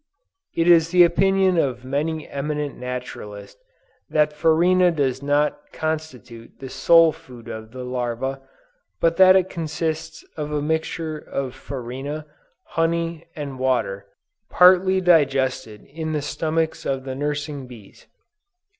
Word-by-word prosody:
It 165 0 +1
is 165 -2 +6
the 180 0 +6
opinion 190 +1 +3
of 130 -4 -1
many 150 +4 -2
eminent 150 +1 -3
naturalists 125 - -7 0.5
that 150 -1 +2
farina 175 +4 +3
does 135 -5 -1
not 150 - 0
constitute 145 -8 -5
the 135 - -8
sole 165 +2 +5
food 125 -5 -14
of 110 0 -7
the 130 0 -7
larva, 125 +2 -3 0.6
but 165 0 +2
that 185 0 +8
it 190 -1 +3
consists 160 -1 -4
of 150 -1 -4
a 150 - 0
mixture 160 +1 -2
of 135 -4 -5
farina, 135 +4 -6 0.4
honey 165 0 -1
and 140 -4 -6
water, 100 -7 -1 0.4
partly 185 +1 +5
digested 135 - +1
in 160 +1 -5
the 150 -2 -2
stomachs 160 +1 -2
of 135 -1 -2
the 130 -1 -5
nursing 145 0 -4
bees." 115 -5 -15
150 Hz, 130 wpm, -22 LUFS, 130-165 Hz, 0.6 s, that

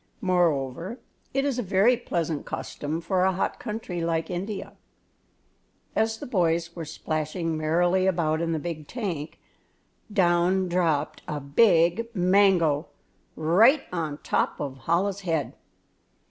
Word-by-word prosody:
Moreover, 175 - 0 0.3
it 275 +1 0
is 270 -3 0
a - - +1
very 200 +4 +3
pleasant 170 -10 -2
custom 155 +3 -4
for 180 +2 0
a 190 - +4
hot 185 - -2
country 210 -6 -4
like 165 +1 -1
India. 195 +3 -4 1.2
As 220 0 +1
the - - -7
boys 170 -5 0
were 165 -2 -5
splashing 155 +2 -3
merrily 175 +4 +2
about 165 -3 +1
in 165 0 -1
the 160 - 0
big 155 -2 -5
tank, 180 - -4 0.7
down 185 -1 +2
dropped 165 -4 0
a 150 - -3
big 170 +7 +3
mango 180 -5 +3 0.5
right 220 - +4
on 160 -4 -2
top - - 0
of 135 -3 -6
Chola's 190 +4 +1
head. 165 -6 -1
175 Hz, 130 wpm, -26 LUFS, 160-195 Hz, 1.2 s, a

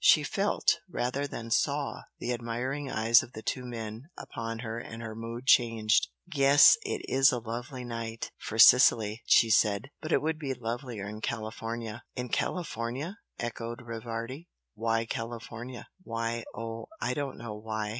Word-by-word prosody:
She - - +7
felt - - +1
rather 135 +4 -1
than 115 -4 -7
saw 140 +5 +1 0.2
the 125 - -2
admiring 125 +4 -3
eyes 115 0 +5
of 120 - -11
the 110 - -8
two 130 - -2
men 115 +3 -6
upon 115 -1 -5
her 115 +1 -3
and 115 0 -8
her 110 -1 -5
mood 115 +2 -6
changed. 115 -3 +4 0.3
"Yes 140 0 +8
it 420 - -3
is 135 +1 +5
a 125 - 0
lovely 120 +3 -5
night, 115 -1 -5
for 110 - -5
Sicily," 115 -2 +7
she 115 -1 +6
said. 105 +5 +3
"But 155 - -5
it - - +3
would 155 0 -1
be 135 -4 -2
lovelier 115 -3 -4
in 105 +1 -7
California!" 115 0 -4
"In 125 -1 -4
California!" 150 - -2 0.2
echoed 120 0 -4
Rivardi 115 +6 -5 0.3
"Why 115 +1 0
California?" 115 +1 -6
"Why? 115 -5 -3
Oh, 115 0 -5
I - - 0
don't 140 0 -3
know 115 -2 -6
why! 110 0 -4
115 Hz, 155 wpm, -29 LUFS, 115-130 Hz, 0.3 s, Yes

